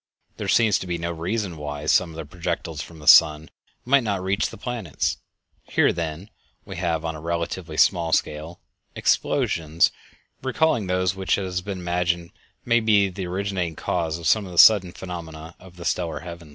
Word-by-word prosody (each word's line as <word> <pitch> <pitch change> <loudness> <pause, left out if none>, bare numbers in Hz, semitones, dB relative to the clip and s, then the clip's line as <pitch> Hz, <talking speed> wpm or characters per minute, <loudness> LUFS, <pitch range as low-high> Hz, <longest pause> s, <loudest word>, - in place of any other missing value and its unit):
There - - -4
seems 110 -5 +3
to 95 - -7
be 85 -1 -2
no 85 +1 -3
reason 90 +2 -3
why 75 0 -6
some 85 +3 +3
of 80 - -11
the 80 -1 -6
projectiles 85 -1 -4
from 85 - -10
the 75 -1 -12
sun 75 +1 +6 0.3
might 135 +2 +4
not 100 -4 -2
reach 95 +3 0
the 110 - -11
planets. 110 - -3 0.5
Here, - - +2
then, 85 +5 -5 0.3
we - - -8
have 85 -2 -1
on 80 - -2
a 75 - -9
relatively 85 0 -4
small 85 -2 +3
scale, 80 +3 -1 0.4
explosions 80 0 +1 0.5
recalling 130 -5 +1
those 90 0 +1
which 95 -1 0
it 100 - -3
has 90 -1 -3
been 100 0 -5
imagined 85 -1 -1 0.3
may 120 -1 +4
be 105 -3 +3
the 95 0 -6
originating 90 -2 -2
cause 80 -2 -2
of 85 - -9
some 110 +4 +3
of - - -9
the 85 - -9
sudden 95 -2 +7
phenomena 80 -3 -8
of 90 -1 -15
the 85 -1 -10
stellar 80 -2 -1
heavens. 85 -2 -9
85 Hz, 185 wpm, -24 LUFS, 80-95 Hz, 0.5 s, sudden